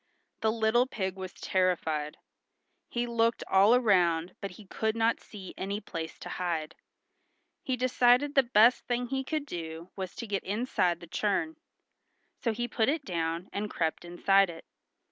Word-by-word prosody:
The 220 - +2
little 225 +3 +2
pig 190 -6 -3
was 190 -1 -6
terrified. 160 -5 -1 0.7
He 240 0 -1
looked 230 -1 +1
all 200 +5 +6
around 180 -7 +3
but 200 - -3
he 215 - -13
could 220 +3 -1
not 230 0 +2
see 195 -3 -10
any 200 +2 -2
place 165 -6 -6
to - - -8
hide. 160 -3 -2 0.9
He 260 -1 -2
decided 250 +2 +3
the 275 - +6
best 235 -1 +4
thing 245 0 -1
he 270 0 -1
could 305 +1 -2
do 165 - -7
was 190 -2 -5
to - - -5
get 200 -3 -2
inside 190 -5 0
the - - -8
churn. 205 - -1 0.8
So 230 - 0
he 240 +2 -2
put 225 0 +1
it 300 -1 -1
down 170 0 -2
and 205 +1 -2
crept 160 -4 -1
inside 195 +2 +3
it. 165 -1 -10
205 Hz, 165 wpm, -29 LUFS, 175-240 Hz, 0.9 s, all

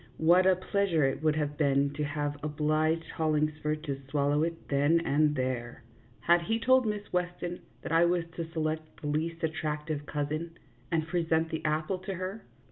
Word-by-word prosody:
What 175 +3 +5
a 190 - +6
pleasure 185 -3 +1
it 135 +2 0
would 155 -1 +2
have 150 -1 -2
been 140 -1 +2
to 150 +1 -2
have 145 0 -2
obliged 155 +2 +1
Hollingsford 155 -1 0
to 140 -3 -4
swallow 145 +1 +2
it 165 +1 -3
then 145 +4 +3
and 150 +1 +3
there! 125 -2 -3 0.4
Had 170 +6 +4
he 225 +6 0
told 260 0 +4
Miss 210 -1 -4
Weston 180 0 -2 0.2
that - - -5
I 165 +1 +5
was 175 0 +2
to 165 -1 -5
select 155 -1 -3
the - - -9
least 165 +3 -2
attractive 155 -2 -2
cousin, 155 +3 -3 0.3
and 160 -2 +1
present 165 -1 +1
the 160 - -3
apple 155 +5 0
to 190 +1 -5
her 190 +4 -5
155 Hz, 175 wpm, -30 LUFS, 150-170 Hz, 0.4 s, a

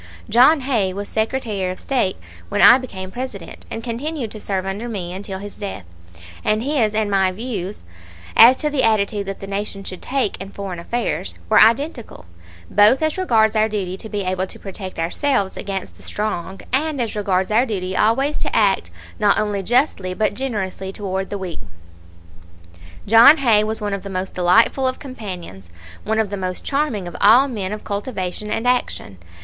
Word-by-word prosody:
John 265 +6 +6
Hay 225 -8 0
was 200 +1 -5
Secretary 220 -4 -2
of 185 - -8
State 245 -9 0 0.3
when - - -1
I 250 - +8
became 190 -7 -7
President, 240 -8 -7
and 225 - -6
continued 250 +1 -4
to 215 - -9
serve 190 -2 -2
under 205 +5 -4
me 180 -5 -4
until 190 0 -6
his 205 +1 -8
death, 195 - -6 0.6
and 215 +1 +1
his 250 -7 +1
and 215 -1 0
my 190 -1 +3
views 205 -2 -5 0.5
as 245 +3 +8
to 300 -1 -1
the 285 -3 +1
attitude 205 -3 +1
that 195 - -6
the - - -5
Nation 195 0 -4
should 185 -1 -7
take 260 -8 -1
in 195 - -7
foreign 195 -3 -6
affairs 170 - -3
were - - +6
identical, 235 - +1 0.4
both 215 +8 +4
as 315 -1 +1
regards 225 - +2
our 215 0 +3
duty 190 -4 -3
to 220 - -9
be 205 -2 -2
able 185 0 -1
to - - -10
protect 190 -1 -8
ourselves 195 - 0
against 195 -2 -5
the - - -17
strong 195 -3 -4
and 295 +1 0
as 230 -3 -2
regards 190 -2 0
our 235 +5 +3
duty 185 -4 -3
always 270 +9 +2
to - - -2
act - - +2 0.3
not 205 -1 +3
only 205 -2 -1
justly 195 -4 +1
but 215 +1 +1
generously 205 -6 -4
toward 190 -1 -4
the 205 - -3
weak. 185 -3 -6 1.5
John 230 +8 +8
Hay 230 -7 +4
was 220 +1 -3
one 205 -1 -2
of 200 - -3
the 200 - -8
most 185 0 -4
delightful 220 +9 +3
of 255 - -2
companions, 185 - -8 0.3
one 220 +1 -1
of 220 -3 0
the 200 - -3
most 185 -1 -4
charming 275 -10 -1
of 175 - -8
all 240 +7 +6
men 205 -7 -4
of 210 - -5
cultivation 200 -1 -4
and 225 +3 -1
action. 245 - -1
210 Hz, 185 wpm, -20 LUFS, 190-240 Hz, 1.5 s, I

